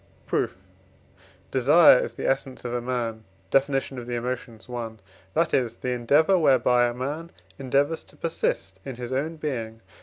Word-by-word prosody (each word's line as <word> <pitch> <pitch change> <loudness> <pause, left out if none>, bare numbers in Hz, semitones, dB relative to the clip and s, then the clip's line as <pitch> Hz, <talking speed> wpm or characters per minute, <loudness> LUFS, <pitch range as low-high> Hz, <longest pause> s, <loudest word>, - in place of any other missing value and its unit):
Proof. - - -1 1.0
Desire 140 +2 +7
is - - -3
the - - -4
essence 135 -1 -2
of 120 - -3
a 120 - -1
man 120 -3 -3 0.3
(Def. 135 +1 +4
of 135 -3 -3
the 120 - -2
Emotions, 120 -4 -5
i.), 120 -2 -4 0.5
that 165 0 +2
is, 120 -3 +1
the 125 - -3
endeavour 145 +10 +3
whereby 125 -4 +4
a 120 - -3
man 145 +6 -4 0.3
endeavours 140 +4 +1
to - - -20
persist 95 - -2
in 135 - -6
his 125 +1 -5
own 150 +5 -1
being. 115 -8 -4
125 Hz, 160 wpm, -25 LUFS, 120-145 Hz, 1.0 s, Desire